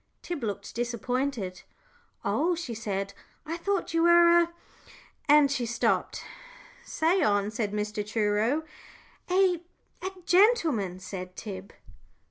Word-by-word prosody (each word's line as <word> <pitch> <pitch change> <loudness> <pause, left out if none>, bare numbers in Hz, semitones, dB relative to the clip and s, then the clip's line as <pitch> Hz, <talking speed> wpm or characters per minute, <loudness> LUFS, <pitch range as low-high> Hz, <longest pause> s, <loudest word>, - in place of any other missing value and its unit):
Tib 345 -5 -4
looked 205 -3 -4
disappointed. 240 -4 -2 0.6
"Oh," 350 +2 +1
she 325 -8 -5
said, 200 -3 -3 0.3
"I 325 - -3
thought 390 0 -2
you 330 - +2
were 345 0 +7
a 340 0 0 0.4
" - - -24
and 295 -1 +6
she 250 -4 -1
stopped. 235 +1 0 0.6
"Say 340 +4 +1
on," 205 0 +2
said 220 -2 -2
Mr. 210 0 -2
Truro. 215 +7 +1 0.7
"A 365 -2 +3 0.4
a 375 - -2 0.2
gentleman," 330 - +3
said 185 -1 -7
Tib. 195 -1 -7
240 Hz, 120 wpm, -28 LUFS, 205-335 Hz, 0.7 s, were